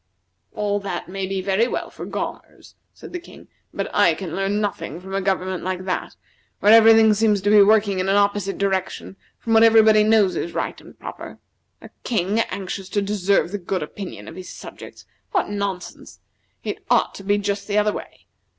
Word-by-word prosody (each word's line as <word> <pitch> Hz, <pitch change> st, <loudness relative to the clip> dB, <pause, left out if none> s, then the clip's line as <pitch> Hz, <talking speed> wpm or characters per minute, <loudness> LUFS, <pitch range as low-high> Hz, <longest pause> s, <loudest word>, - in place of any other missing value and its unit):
"All 205 Hz, -1 st, -1 dB
that 195 Hz, -3 st, -5 dB
may 190 Hz, 0 st, -4 dB
be 195 Hz, 0 st, -2 dB
very 200 Hz, +4 st, +2 dB
well -, -, -4 dB
for -, -, -8 dB
Gaumers," -, -, -7 dB, 0.2 s
said -, -, -13 dB
the 360 Hz, -, -3 dB
King, 350 Hz, -, -15 dB, 0.2 s
"but -, -, -3 dB
I -, -, +4 dB
can 185 Hz, -5 st, -6 dB
learn 195 Hz, +2 st, 0 dB
nothing 200 Hz, -6 st, -3 dB
from 190 Hz, +1 st, -10 dB
a 195 Hz, -, 0 dB
government 185 Hz, -1 st, -1 dB
like 185 Hz, 0 st, -3 dB
that, 185 Hz, -, -3 dB, 0.4 s
where 210 Hz, +2 st, +5 dB
every 225 Hz, 0 st, +8 dB
thing 220 Hz, -1 st, +5 dB
seems 210 Hz, -1 st, +2 dB
to 205 Hz, -, +2 dB
be 210 Hz, -1 st, +8 dB
working 205 Hz, -1 st, +3 dB
in 185 Hz, +1 st, -1 dB
an 195 Hz, -, +3 dB
opposite 200 Hz, -1 st, +1 dB
direction 190 Hz, -1 st, -2 dB, 0.2 s
from 225 Hz, -, -2 dB
what 225 Hz, -, +6 dB
everybody 220 Hz, -1 st, +6 dB
knows 215 Hz, -3 st, +3 dB
is 170 Hz, -, -4 dB
right -, -, -3 dB
and -, -, -16 dB
proper. -, -, -9 dB, 0.5 s
A -, -, -12 dB
king 210 Hz, -1 st, 0 dB
anxious 195 Hz, 0 st, -5 dB
to 205 Hz, -, 0 dB
deserve 200 Hz, -3 st, +1 dB
the 205 Hz, -, -3 dB
good 185 Hz, -1 st, -3 dB
opinion 185 Hz, +5 st, -8 dB
of -, -, -9 dB
his 185 Hz, 0 st, -8 dB
subjects! -, -, -11 dB, 0.3 s
What 380 Hz, -, +1 dB
nonsense! 200 Hz, -3 st, -5 dB, 0.4 s
It -, -, -5 dB
ought -, -, +2 dB
to 195 Hz, -, -10 dB
be 205 Hz, +1 st, +2 dB
just 200 Hz, 0 st, -3 dB
the 205 Hz, 0 st, 0 dB
other 210 Hz, 0 st, +2 dB
way. -, -, -9 dB
200 Hz, 195 wpm, -22 LUFS, 190-210 Hz, 0.5 s, every